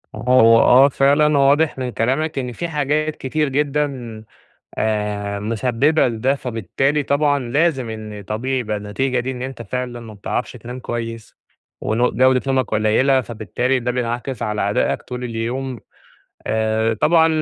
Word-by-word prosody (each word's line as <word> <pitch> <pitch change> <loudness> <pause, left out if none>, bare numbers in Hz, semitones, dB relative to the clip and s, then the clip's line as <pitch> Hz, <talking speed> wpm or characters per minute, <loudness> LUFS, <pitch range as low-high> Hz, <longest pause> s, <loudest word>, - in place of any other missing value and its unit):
هو 115 -2 +5
آه، 135 +3 +6
فعلًا 145 +2 +3
واضِح 145 +2 +3
من 130 -1 -3
كلامك 135 +6 -1
إن 125 -1 -4
في 170 +8 -4
حاجات 155 0 -1
كتير 150 +2 -1
جدًا 135 -6 -2 0.6
آآ، 105 -2 -1
مسبِّبة 125 +7 +1
لده، 120 +4 0
فبالتالي 130 - -1
طبعًا 145 +1 +2
لازم 135 -1 0
إن 110 -2 -7
طبيعي 130 +6 -2
يبقى 110 -3 -2
النتيجة 120 +5 -1
دي، 130 +2 -3
إن 125 -1 -6
أنتَ 130 -2 -6
فعلًا 125 +2 -4
ما 110 -2 -10
بتعرَفش 100 +4 -3
تنام 125 +1 -8
كويِّس، 115 -2 -6 0.4
ون 120 +3 +1
جودة 130 0 +3
نومَك 130 -2 +1
قليلة. 120 +6 +3
فبالتالي 120 +3 -2
ده 125 +1 -1
بينعكس 120 0 -3
على 105 -2 -1
أدائَك - - 0
طول 125 0 -6
اليوم. 120 +2 -4 0.7
آآ 110 +1 +1
طبعًا، 160 +8 +4
125 Hz, 145 wpm, -20 LUFS, 115-135 Hz, 0.7 s, آه